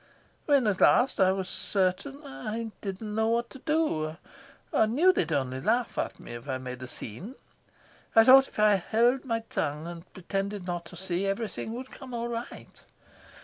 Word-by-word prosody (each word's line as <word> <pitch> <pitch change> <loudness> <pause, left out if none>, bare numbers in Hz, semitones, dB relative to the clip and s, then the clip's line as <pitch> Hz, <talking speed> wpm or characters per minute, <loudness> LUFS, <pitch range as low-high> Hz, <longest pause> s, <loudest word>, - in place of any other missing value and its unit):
When 280 -4 +4
at 205 -3 0
last 245 -2 +4
I 190 -1 +5
was 190 -1 -2
certain 200 +10 -1
I 230 -4 -5
didn't 205 +2 -5
know 220 +1 +1
what 235 +1 0
to 270 - -11
do; 250 - 0 0.6
I 220 - +4
knew 320 +12 +4
they'd 165 - 0
only 130 -3 -1
laugh 230 - +1
at - - -3
me - - -9
if 120 +4 -9
I 130 - -1
made 125 -1 -7
a 130 - -6
scene. 165 - -7 0.8
I 225 - +9
thought 265 +2 +8
if - - -17
I 210 -1 +5
held 240 +7 +2
my 230 -3 -1
tongue 155 -8 -3
and 170 +1 -9
pretended 195 +1 -3
not 175 -1 -3
to 180 - -11
see, 185 +1 -2
everything 220 +2 -3
would 255 +2 -7
come 255 -2 -9
right. 235 0 -6
210 Hz, 180 wpm, -28 LUFS, 175-240 Hz, 0.8 s, I